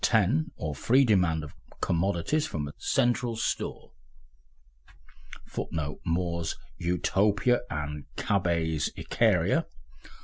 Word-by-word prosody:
IX.] 115 - +3
or 80 -3 -3
free 130 - +4
demand 90 -8 +3
of 75 - -9 0.3
commodities 95 - +1
from 75 - -3
a 70 - -8
central 120 -1 +1
store 110 - -3 1.5
[Footnote: 75 -2 -4
More's 85 -1 -1 0.2
Utopia 100 +7 +2
and 75 -3 -4
Cabet's 85 -6 +1
Icaria. - - +2
90 Hz, 95 wpm, -28 LUFS, 80-110 Hz, 1.5 s, free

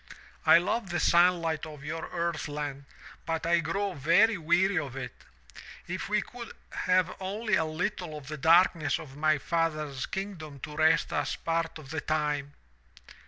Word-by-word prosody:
I - - +9
love 195 +4 -1
the 175 -1 -1
sunlight 170 -3 +3
of 150 -2 -10
your 160 +2 -5
earth 170 -2 -2
land, 145 -2 -5 0.4
but 165 0 -2
I 170 +1 +3
grow 195 +5 -1
very 175 - +4
weary 180 +2 +2
of 140 -4 -6
it. 135 - -5 0.7
If 185 +3 -4
we 210 0 +2
could 240 -1 -9 0.2
have 185 -1 +1
only 205 +3 -3
a 160 - +4
little 155 0 -3
of 140 -3 -11
the 155 - -4
darkness 165 -1 +4
of 140 -4 -10
my 155 +1 +2
father's 155 -3 -1
kingdom 175 -8 -6
to 150 -2 -7
rest 160 +1 +3
us - - -1
part 165 0 -2
of 145 -3 -11
the 160 -2 -2
time!' 150 -2 -1
165 Hz, 165 wpm, -29 LUFS, 150-180 Hz, 0.7 s, I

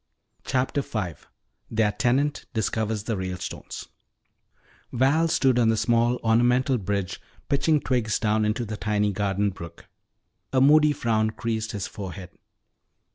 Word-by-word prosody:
CHAPTER 130 +2 0
V 105 -10 -3 0.6
THEIR 110 -2 +2
TENANT 135 +7 0
DISCOVERS 110 0 -1
THE 115 0 -2
RALESTONES 95 -1 -6 1.0
Val 140 +7 +3
stood 130 -6 +2
on 115 -2 +4
the 110 - +2
small 120 +2 +2
ornamental 120 +3 +3
bridge 100 -2 -3 0.3
pitching 150 +2 +2
twigs 120 -6 0
down 110 0 +1
into 110 +3 0
the 110 0 -5
tiny 105 +1 0
garden 100 0 0
brook. 85 -2 -11 0.7
A 130 - +4
moody 150 +3 +6
frown 110 -5 +1
creased 110 0 -3
his 100 -3 -3
forehead. 95 -2 -8
110 Hz, 130 wpm, -25 LUFS, 105-125 Hz, 1.0 s, moody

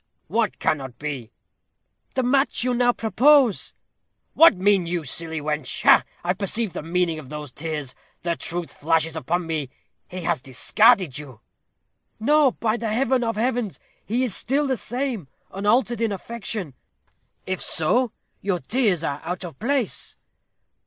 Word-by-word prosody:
"What 225 -2 0
cannot 135 -6 -1
be?" 135 -6 -5 0.8
"The 260 - +1
match 270 0 +2
you 250 0 +1
now 245 0 +3
propose." 240 +2 +3 0.6
"What 330 -7 +7
mean 190 -2 +3
you, 170 -1 -2
silly 160 +3 -2
wench? 150 -2 -3
Ha! - - +7 0.2
I 175 +1 +1
perceive 200 +1 -1
the - - -4
meaning 165 0 0
of 135 -4 -11
those 150 -2 -7
tears. 150 -4 -4 0.3
The 170 -1 0
truth 170 0 -3
flashes 165 +1 +1
upon 170 +2 -1
me. 155 -5 -2 0.4
He 185 0 -7
has 170 -5 0
discarded 180 - +3
you." 130 -6 -11 0.8
"No, 285 +2 +4
by 225 0 -1
the 225 -2 -3
Heaven 255 +2 +2
of 230 -1 -1
Heavens, 235 -2 -1 0.2
he 240 +5 0
is 245 -6 0
still 280 +5 +1
the 265 -2 +1
same 245 - -3 0.2
unaltered 230 +4 +1
in 225 -2 +1
affection." 200 - -4 0.7
"If 185 -1 -3
so, 235 +10 +1 0.3
your 195 -2 0
tears 195 - +1
are 145 -2 -2
out 180 +3 -4
of 170 - -10
place." 255 0 -1
190 Hz, 150 wpm, -23 LUFS, 160-240 Hz, 0.8 s, What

